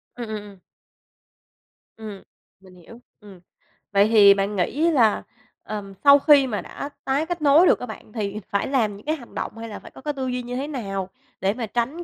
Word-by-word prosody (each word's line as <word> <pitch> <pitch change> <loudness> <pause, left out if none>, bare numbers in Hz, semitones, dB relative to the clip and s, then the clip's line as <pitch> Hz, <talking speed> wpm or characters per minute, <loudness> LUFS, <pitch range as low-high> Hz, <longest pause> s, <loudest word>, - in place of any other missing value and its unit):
Ừm, 240 -2 -6
ừm, 215 - -3
ừm. 200 -3 -14 1.4
Ừm, 210 -3 -9 0.4
mình 185 -1 -18
hiểu, 205 +7 -15 0.2
ừm. 200 -4 -14 0.5
Vậy 200 +1 +4
thì 205 -3 +7
bạn 200 +1 -2
nghĩ 295 - +1
là, 230 -8 +3 0.4
ờm, 200 -2 -6
sau 280 0 +8
khi 285 -2 +5
mà 215 -4 -3
đã 280 - -7 0.2
tái 275 +3 0
kết 345 -1 -4
nối 300 +5 +6
được - - +4
á 250 - -5
bạn, 220 -1 -11
thì 210 -2 -3
phải 200 - -1
làm 225 -7 0
những 205 - -16
cái 310 +1 0
hành 240 -6 -14
động - - -5
hay 230 0 -7
là 205 - -7
phải - - -14
có - - -14
cái 295 +1 -3
tư 265 -2 -4
duy 250 0 -2
như 245 +1 -6
thế 275 +3 -3
nào 195 -9 -4 0.3
để 195 +2 +1
mà 230 -1 -4
tránh 245 +10 -2
225 Hz, 215 wpm, -23 LUFS, 200-275 Hz, 1.4 s, sau